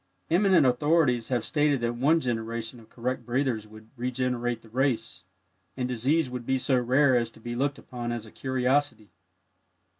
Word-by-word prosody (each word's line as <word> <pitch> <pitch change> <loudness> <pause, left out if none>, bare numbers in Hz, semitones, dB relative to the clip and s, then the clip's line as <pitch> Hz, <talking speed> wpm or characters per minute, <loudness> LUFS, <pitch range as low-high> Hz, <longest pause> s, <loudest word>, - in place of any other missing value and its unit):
Eminent 185 -3 +5
authorities 125 -2 +2
have 120 -4 -1
stated 145 -2 +2
that 120 0 0
one 145 +7 +3
generation 115 -2 -3
of 110 - -18
correct 125 +2 -3
breathers 120 -3 -1
would 110 +1 -15
regenerate 120 -1 -2
the 115 - -16
race, 115 -7 -1 0.5
and 125 -1 -1
disease 130 +6 +1
would 125 -1 -6
be 130 +2 0
so 130 0 +2
rare 130 +2 +3
as 120 -2 +1
to 115 - -18
be 120 +1 -6
looked 140 +3 0
upon 120 -1 -6
as 120 -2 -4
a 110 - -14
curiosity. 130 -3 -1
125 Hz, 170 wpm, -27 LUFS, 115-135 Hz, 0.5 s, Eminent